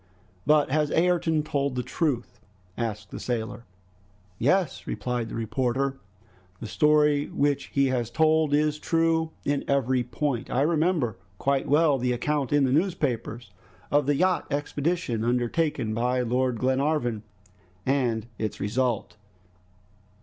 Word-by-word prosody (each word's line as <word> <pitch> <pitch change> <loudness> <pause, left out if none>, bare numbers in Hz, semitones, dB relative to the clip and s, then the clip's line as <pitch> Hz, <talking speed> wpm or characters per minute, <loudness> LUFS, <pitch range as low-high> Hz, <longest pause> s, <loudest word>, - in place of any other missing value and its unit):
"But 150 -3 +4
has 150 0 +2
Ayrton 165 -2 +2
told 140 -3 -1
the 125 - -1
truth?" 130 0 -2 0.4
asked 110 -3 -4
the - - -6
sailor. 120 -1 -4 0.7
"Yes," 165 +5 +1
replied 120 -2 -3
the - - -6
reporter. 130 +4 -1 0.6
"The - - -7
story 150 +7 +3
which 140 0 0
he 140 -1 +1
has 120 -3 -1
told 155 +2 +2
is 150 +1 +2
true 165 -1 +1 0.2
in 145 0 0
every 130 -2 +1
point. 125 0 -2
I 130 - +1
remember 155 - +1 0.2
quite 140 +4 0
well 150 -1 +3
the 125 0 0
account 140 +2 -1
in 145 -1 +4
the 130 - +2
newspapers 130 - -1 0.4
of 145 -1 +3
the 145 - +3
yacht 185 0 +1
expedition 145 -3 -1
undertaken 120 0 0
by 125 +3 +1
Lord 125 0 0
Glenarvan, 130 -2 0 0.6
and 120 -5 +1
its 110 -2 -3
result." 115 +1 -1
135 Hz, 130 wpm, -26 LUFS, 120-150 Hz, 0.7 s, But